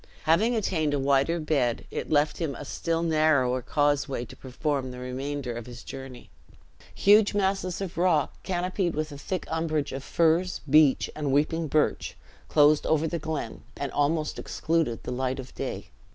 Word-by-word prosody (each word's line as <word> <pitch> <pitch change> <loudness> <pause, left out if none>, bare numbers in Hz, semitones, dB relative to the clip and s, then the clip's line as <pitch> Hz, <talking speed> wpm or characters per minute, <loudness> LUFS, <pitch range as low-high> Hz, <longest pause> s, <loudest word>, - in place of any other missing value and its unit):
Having 205 +10 +3
attained 160 -9 0
a - - 0
wider 140 +5 +2
bed, 140 -7 0
it - - -4
left 150 0 +2
him 160 -5 -2
a 145 - -8
still 165 +4 -2
narrower 155 -6 +2
causeway 145 -1 0
to - - -13
perform 135 0 -3
the 125 - -8
remainder 130 +1 -4
of 120 0 -7
his 120 -1 -10
journey. 130 -2 -9 0.6
Huge 205 +1 +5
masses 195 -2 0
of 175 -3 -5
rock, 175 -5 +2
canopied 180 -1 -1
with 155 0 -2
a 145 - -8
thick 185 +3 -3
umbrage 160 -2 -1
of 135 +1 -5
firs, 170 +4 +1
beech, 150 -1 +5
and 150 -3 -2
weeping 155 +3 +1
birch, 150 +1 0 0.3
closed 150 0 +4
over 160 0 +2
the 170 +1 -3
glen 155 -7 -4 0.2
and 140 -2 -3
almost 150 +1 0
excluded 160 -8 -1
the - - -5
light 130 +1 -1
of 130 -1 -8
day. - - -5
150 Hz, 165 wpm, -27 LUFS, 135-165 Hz, 0.6 s, Huge